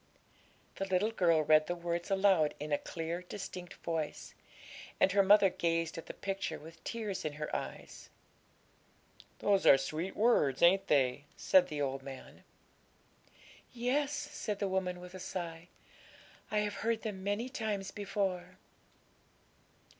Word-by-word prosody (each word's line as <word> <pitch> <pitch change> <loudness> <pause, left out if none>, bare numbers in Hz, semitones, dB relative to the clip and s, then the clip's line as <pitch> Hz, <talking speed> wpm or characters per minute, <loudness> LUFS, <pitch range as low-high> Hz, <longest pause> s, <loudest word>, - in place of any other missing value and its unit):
The 195 - -1
little 190 +4 +1
girl 170 -7 +3
read 155 0 +5
the 175 - -1
words 170 0 -3
aloud 190 -6 +3
in 150 +1 -5
a 145 - +2
clear, 165 +1 -4
distinct 180 -1 -7
voice; 160 -3 -3 0.7
and 190 - +5
her 200 +1 +5
mother 195 -1 +6
gazed 165 -1 0
at 165 - -8
the - - -6
picture 195 0 -3
with 160 +1 -13
tears 215 -5 -4
in 155 - -3
her 150 0 -4
eyes. - - -7 1.3
'Those 200 -2 +2
are 135 - +9
sweet 155 +7 -4
words, 205 - +3
ain't 195 +3 +5
they?' 140 0 +2
said 185 -2 +5
the 150 -4 -2
old 135 0 -2
man. 135 -1 -10 1.3
'Yes,' 260 +4 0
said 290 -8 -4
the 200 - -1
woman, 185 -1 -1
with 180 0 -11
a 185 - -8
sigh; 170 -2 -5 0.8
'I 215 - -1
have 210 0 -2
heard 225 0 0
them 200 -4 -5
many 205 +5 -1
times 215 -6 -3
before.' 190 -3 -3
185 Hz, 145 wpm, -33 LUFS, 165-205 Hz, 1.3 s, are